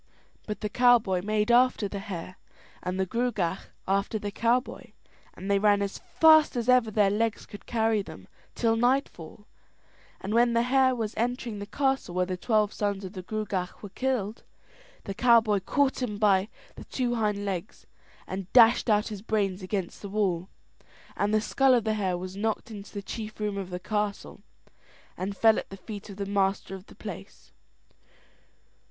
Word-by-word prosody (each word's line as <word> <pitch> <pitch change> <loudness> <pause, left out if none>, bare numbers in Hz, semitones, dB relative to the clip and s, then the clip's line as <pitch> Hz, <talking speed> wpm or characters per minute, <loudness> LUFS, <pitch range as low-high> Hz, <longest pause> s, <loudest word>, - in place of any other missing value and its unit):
But 210 - -5
the 210 - -1
cowboy 230 -6 +4
made 210 +3 0
after 245 -3 +4
the 200 0 -5
hare, 185 -3 -7 0.4
and 180 +1 -3
the 190 - +2
Gruagach 200 -5 -2 0.2
after 200 +3 0
the 205 -1 -5
cowboy, 235 +5 -1 0.4
and 190 - -8
they 200 0 +3
ran 205 -1 +3
as 200 - -4
fast 315 -3 +5
as 240 -1 -2
ever 250 -3 +4
their 205 -2 +3
legs 225 +1 -1
could 205 - -12
carry 225 -2 +1
them - - -11 0.3
till 225 -1 +2
nightfall; 225 - -1 0.7
and 195 +3 -4
when 235 +1 +4
the 235 0 +3
hare 260 +1 +3
was 225 -2 -3
entering 235 -2 -2
the 205 - -6
castle 265 -8 -1
where 180 0 +2
the 185 0 -3
twelve 215 +2 +1
sons 200 -1 -2
of 185 - -8
the 185 - -6
Gruagach 195 -2 -4
were 205 - -7
killed, 235 -5 -2 0.6
the 195 - -5
cowboy 225 -2 +4
caught 270 +7 0
him 215 -5 -2
by 200 -1 +3 0.3
the - - -10
two 245 -2 -1
hind 210 -3 -1
legs 190 0 -5 0.4
and 190 -1 -6
dashed 240 0 +6
out 210 0 +2
his 210 -3 -7
brains 200 -3 -1
against 185 -1 -4
the 200 - -7
wall; 190 -3 -1 0.7
and 205 +1 0
the 215 - +3
skull 265 +4 +3
of 235 - +1
the 220 0 0
hare 190 -4 -1
was 185 +1 -7
knocked 220 +3 -2
into 205 -2 -9
the 200 -1 -6
chief 215 +1 -7
room 210 -1 -2
of 195 -2 -5
the 180 0 -5
castle, 210 0 -3 0.7
and 195 +2 -4
fell 220 -1 +5
at - - -9
the 195 - -9
feet 205 +2 -9
of 200 - -8
the 200 - -3
master 195 -1 0
of 190 +1 -9
the - - -15
place. - - -10
210 Hz, 180 wpm, -27 LUFS, 195-230 Hz, 0.7 s, dashed